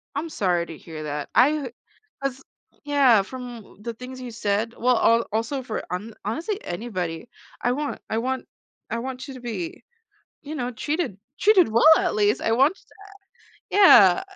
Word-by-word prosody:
I'm 315 Hz, +3 st, -3 dB
sorry 180 Hz, -, 0 dB
to 160 Hz, -, -9 dB
hear 155 Hz, -1 st, -9 dB
that, 150 Hz, -1 st, -4 dB
I 270 Hz, -, +7 dB, 0.2 s
h 235 Hz, -, -8 dB, 0.5 s
cause 265 Hz, -1 st, -3 dB, 0.4 s
Yeah, 275 Hz, -7 st, +4 dB
from 240 Hz, -2 st, -9 dB
the 235 Hz, +1 st, -5 dB
things 255 Hz, +2 st, -9 dB
you 250 Hz, -1 st, -6 dB
said, 220 Hz, +1 st, -1 dB
well, 250 Hz, +1 st, +2 dB
al 230 Hz, +1 st, +3 dB
also 230 Hz, +5 st, -1 dB
for 230 Hz, -3 st, -4 dB
hon 210 Hz, +5 st, -5 dB
honestly, 325 Hz, -, -2 dB
anybody 180 Hz, -1 st, -4 dB, 0.3 s
I 245 Hz, -, +2 dB
want 290 Hz, +3 st, -3 dB
I 220 Hz, -, 0 dB
want 260 Hz, +2 st, -2 dB, 0.4 s
I 230 Hz, -, -2 dB
want 260 Hz, +2 st, -6 dB
you 270 Hz, -, -7 dB
to 255 Hz, -, -10 dB
be, 210 Hz, -9 st, -6 dB, 0.6 s
you 295 Hz, +2 st, -7 dB
know, 250 Hz, -4 st, -3 dB
treated 295 Hz, -, -3 dB, 0.2 s
treated 400 Hz, -5 st, +5 dB
well 265 Hz, +9 st, +7 dB
at 375 Hz, -1 st, 0 dB
least, 210 Hz, 0 st, +2 dB
I 225 Hz, -, +1 dB
want 275 Hz, +10 st, +3 dB
that. 400 Hz, -, -19 dB, 0.7 s
Yeah, 205 Hz, -, +7 dB
240 Hz, 170 wpm, -24 LUFS, 210-275 Hz, 0.7 s, I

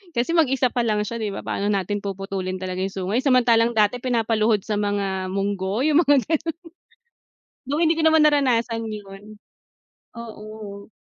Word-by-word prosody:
kasi 245 Hz, +8 st, 0 dB
mag-isa 270 Hz, -5 st, +3 dB
pa 240 Hz, -1 st, -1 dB
lang 215 Hz, -2 st, 0 dB
siya 235 Hz, -, -5 dB
di 210 Hz, -2 st, -2 dB
ba, -, -, -5 dB
paano 205 Hz, +1 st, -2 dB
natin 200 Hz, +1 st, -2 dB
puputulin 195 Hz, -1 st, -4 dB
talaga 185 Hz, 0 st, -3 dB
yung 195 Hz, -, -3 dB
sungay, 195 Hz, +7 st, -2 dB
samantalang 240 Hz, -3 st, +4 dB
dati 215 Hz, +1 st, +2 dB
pinapaluhod 225 Hz, -3 st, +1 dB
sa 210 Hz, -, -1 dB
mga 195 Hz, -2 st, -2 dB
monggo, 195 Hz, +1 st, -2 dB
yung 305 Hz, +4 st, +3 dB
mga 290 Hz, 0 st, +4 dB
ganun. 325 Hz, 0 st, -1 dB, 1.1 s
Though, 285 Hz, +4 st, -2 dB
hindi 330 Hz, -1 st, +3 dB
ko 320 Hz, -, -1 dB
naman 320 Hz, -1 st, +5 dB
naranasan 240 Hz, -5 st, +1 dB
yun 205 Hz, +1 st, -10 dB, 0.8 s
Oo. 215 Hz, -2 st, -9 dB
215 Hz, 155 wpm, -23 LUFS, 200-255 Hz, 1.1 s, naman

